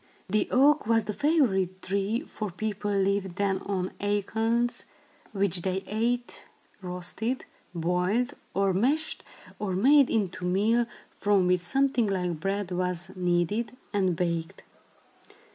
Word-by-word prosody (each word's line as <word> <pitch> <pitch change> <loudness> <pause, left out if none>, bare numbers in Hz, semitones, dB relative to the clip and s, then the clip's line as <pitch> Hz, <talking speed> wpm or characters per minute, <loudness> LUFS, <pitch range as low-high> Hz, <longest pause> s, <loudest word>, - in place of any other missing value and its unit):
The 210 +3 +1
oak 280 0 +4
was 225 -1 +3
the 210 +1 -3
favorite 215 - +2
tree, 200 +4 0
for 215 -2 -5
people 205 +2 -3
lived 195 -2 +1
then 195 -1 +1
on 190 -2 -2
acorns, 220 +4 0 0.5
which 195 -3 0
they 190 +1 -1
ate 240 +3 -1 0.4
roasted, 180 +7 -3 0.3
boiled 180 +8 +1 0.2
or 195 0 +2
mashed, 275 - 0 0.4
or 200 -3 -2
made 270 +8 +5
into 195 -5 -1
meal, 215 +6 +2 0.3
from 200 -2 +3
which 180 0 +3
something 260 +4 +2
like 180 -4 -1
bread 195 +1 -2
was 180 0 -2
kneaded 185 +6 0 0.2
and 190 -4 +2
baked. 170 -1 -2
200 Hz, 125 wpm, -28 LUFS, 180-225 Hz, 0.5 s, made